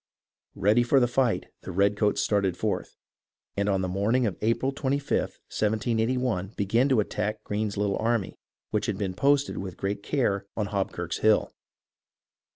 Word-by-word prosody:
Ready 105 +6 +3
for 120 +3 +4
the 120 - +3
fight, 120 -1 +1 0.2
the - - -7
redcoats 100 +3 +2
started 100 -4 +1
forth, - - -2 0.6
and 100 +1 0
on 95 -1 +1
the 95 - -1
morn 100 +6 0
ing 130 -1 +3
of 100 -5 -1
April 115 +5 +1
25th, 140 0 -1
178 110 +3 0
1, 110 -6 -1
began 115 +7 +2
to 130 -5 +4
attack 105 +1 -3
Greene's 105 0 -2
little 100 -1 0
army, 115 -4 -1 0.3
which - - 0
had - - -1
been 95 -3 -2
posted 140 +7 +2
with 95 -2 -6
great 100 +1 -2
care 100 -6 0
on 105 -2 -1
Hobkirk's 95 -4 -2
Hill. 110 -1 +3
105 Hz, 160 wpm, -27 LUFS, 100-120 Hz, 0.6 s, for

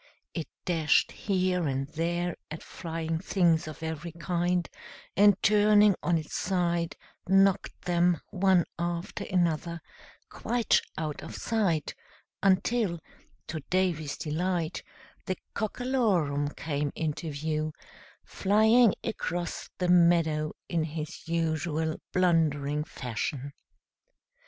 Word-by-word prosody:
It 165 -3 -4 0.2
dashed 160 -4 +3
here 185 -4 0
and 135 0 -1
there 175 +2 -1
at 155 - -7
flying 165 -1 -4
things 170 -3 +2
of 155 +1 -8
every 160 +1 -4
kind, 175 +1 0 0.5
and, 200 -1 +6
turning 210 0 +6
on 175 -1 +2
its 155 -1 -6
side, 175 -3 0 0.3
knocked 195 0 +3
them, 175 -1 +2
one 185 -2 +3
after 170 +1 -3
another, 170 -1 0 0.5
quite 240 -2 +1 0.2
out 155 -2 -3
of - - -8
sight, 195 -9 0 0.5
until, 195 0 +2 0.5
to 155 - -4
Davy's 175 -6 0
delight, 165 +1 -2 0.5
the 185 - -1 0.2
Cockalorum 210 - 0
came 145 -2 -2
into 160 +1 -3
view, 155 +1 -2 0.5
flying 220 +3 +4
across 175 -4 -3
the 180 - 0
meadow 170 -3 +4
in 165 -2 0
his 155 0 -6
usual 160 -1 -1
blundering 150 -5 +2
fashion. 135 +2 -4
170 Hz, 105 wpm, -28 LUFS, 155-185 Hz, 0.5 s, and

